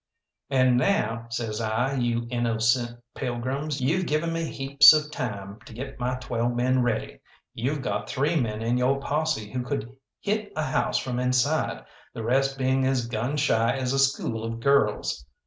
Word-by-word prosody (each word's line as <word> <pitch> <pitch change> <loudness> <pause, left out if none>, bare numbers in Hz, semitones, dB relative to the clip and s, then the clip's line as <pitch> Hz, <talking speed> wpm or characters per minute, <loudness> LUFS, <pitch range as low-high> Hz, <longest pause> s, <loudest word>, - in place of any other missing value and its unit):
"And 130 -2 +4
now," 115 - 0
says 115 -1 -3
I, 115 +5 0
"you 120 -2 0
innocent 120 0 +1
pilgrims, 135 +3 -3
you've 170 +8 +1
given 160 +3 0
me 165 0 -1
heaps 140 0 +6
of 150 -1 0
time 100 -6 -5
to - - -11
get 135 +2 -7
my 125 +1 -1
twelve 120 -1 -2
men 130 +1 +2
ready. 120 -2 -2 0.3
You've 135 +4 -2
got 105 -1 -3
three 145 +5 0
men 115 -6 -1
in 120 +2 +1
yo' 130 +2 +3
posse 140 -6 -2
who 125 - -2
could 125 -1 -4 0.2
hit 210 0 -2
a 155 - -1
house 125 -3 0
from 125 -1 -2
inside, 125 +5 0 0.3
the 115 - -5
rest 135 +3 +1
being 130 0 +1
as 130 -3 +1
gun 120 +5 -2
shy 120 -3 +2
as 130 -1 -1
a 135 - +1
school 135 -4 +1
of 115 0 -4
girls. 115 - +1
125 Hz, 170 wpm, -26 LUFS, 115-140 Hz, 0.3 s, heaps